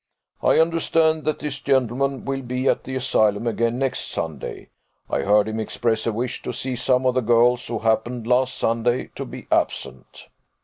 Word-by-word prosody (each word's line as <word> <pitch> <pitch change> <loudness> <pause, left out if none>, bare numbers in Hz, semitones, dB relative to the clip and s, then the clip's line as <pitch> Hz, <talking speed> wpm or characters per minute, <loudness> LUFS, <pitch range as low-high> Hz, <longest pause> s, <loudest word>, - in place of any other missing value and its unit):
I - - +4
understand 160 -1 +2
that 155 - 0
this 145 -2 -4
gentleman 135 0 0
will 135 0 -2
be 125 +1 -2
at - - +1
the 130 - -5
Asylum 110 -4 +1
again 115 0 0
next 135 -1 -1
Sunday; 75 -5 -5 0.4
I - - -1
heard 105 +1 +3
him 110 0 -3
express 110 +1 -1
a - - +2
wish 120 +3 -3
to - - -4
see 130 -1 -3
some 125 +1 +1
of 130 - +3
the 130 - +1
girls 120 +1 +3
who 115 - -2
happened 115 +2 0
last 125 +2 +2
Sunday 120 +2 0
to - - -5
be - - -9
absent." 65 - -2
125 Hz, 180 wpm, -23 LUFS, 115-130 Hz, 0.4 s, I